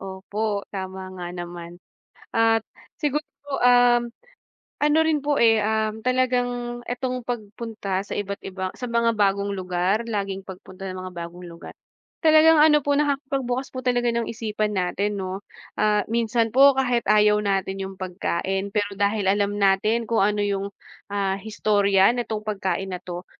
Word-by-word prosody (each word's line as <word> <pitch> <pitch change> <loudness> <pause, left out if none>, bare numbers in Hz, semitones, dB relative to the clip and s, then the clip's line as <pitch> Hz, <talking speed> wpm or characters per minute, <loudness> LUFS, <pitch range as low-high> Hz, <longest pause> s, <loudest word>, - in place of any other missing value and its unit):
Opo, 200 +2 -3
tama 190 -1 -6
nga 175 -1 -5
naman 175 0 -7 0.6
at 225 -1 +3 0.4
sigurp 295 -1 0 0.2
po, 285 -1 -3
um, 245 -1 +5 0.7
ano 295 +1 +3
rin 310 -3 +1
po, 290 -1 +2
eh, 225 -1 +6
um, 220 +1 -1
talagang 245 -1 0
itong 250 0 -2
pagpunta 215 -4 -4
sa - - -6
iba't 200 -1 -3
iba 190 -1 -4
sa 250 - -4
mga 235 0 +2
bagong 200 0 +1
lugar, 185 +3 0
laging 195 -3 -3
pagpunta 190 0 -10
ng 185 - -6
mga 185 -1 -7
bagong 170 +1 -7
lugar, 170 -1 -10 0.5
talagang 315 0 +7
ano 300 -1 +6
po 285 - +2
nakakipagbukas 270 -3 -1
po 255 - -4
talaga 245 -1 +2
ng 235 0 -1
isipan 215 -2 -2
natin 200 +3 -1
'no. 190 +1 -4 0.4
Ah, 210 -1 +2
minsan 230 0 +1
po 275 +2 +7
kahit 245 -3 +2
ayaw 210 0 +5
natin 195 -1 -1
yung 190 0 -6
pagkain 190 +1 -2
pero 205 -1 0
dahil 200 0 +1
alam 205 +1 +1
natin 205 +4 +2
kung 230 - +2
ano 210 0 +1
yung, 200 0 -2 0.4
ah, 195 -1 0
historya 205 -1 +3
nitong 220 -3 -3
pagkain 195 -2 -2
na 180 - -5
'to, 175 0 -7
210 Hz, 155 wpm, -24 LUFS, 195-240 Hz, 0.7 s, talagang